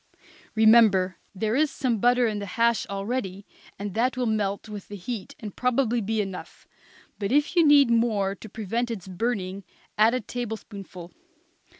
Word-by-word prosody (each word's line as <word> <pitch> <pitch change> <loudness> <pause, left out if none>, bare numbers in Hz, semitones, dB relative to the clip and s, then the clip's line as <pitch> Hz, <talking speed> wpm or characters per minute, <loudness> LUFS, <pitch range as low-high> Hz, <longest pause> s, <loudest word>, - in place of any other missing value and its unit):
Remember 215 -5 +5 0.2
there 215 +4 -1
is 305 +2 +3
some 250 -5 -1
butter 245 +2 +4
in 215 -2 -1
the 200 - -5
hash 235 -1 +2
already, 200 -1 -4 0.3
and 200 -1 -5
that 250 +4 0
will 250 - 0
melt 210 -2 -1
with 210 -2 -8
the 205 - -8
heat 205 +1 -6
and 210 -3 -8
probably 250 -2 +1
be 220 +2 -1
enough; 195 -2 -8 0.5
but 200 0 -2
if 295 +5 +2
you 340 - +6
need 290 -4 +6
any 235 - +4
more 210 -4 +1
to 215 +3 -11
prevent 225 +4 -2
its 200 -6 -6
burning, 195 -1 -3 0.4
add 225 +3 +5
a - - 0
tablespoonful. 210 -6 -7
220 Hz, 170 wpm, -25 LUFS, 195-240 Hz, 0.5 s, you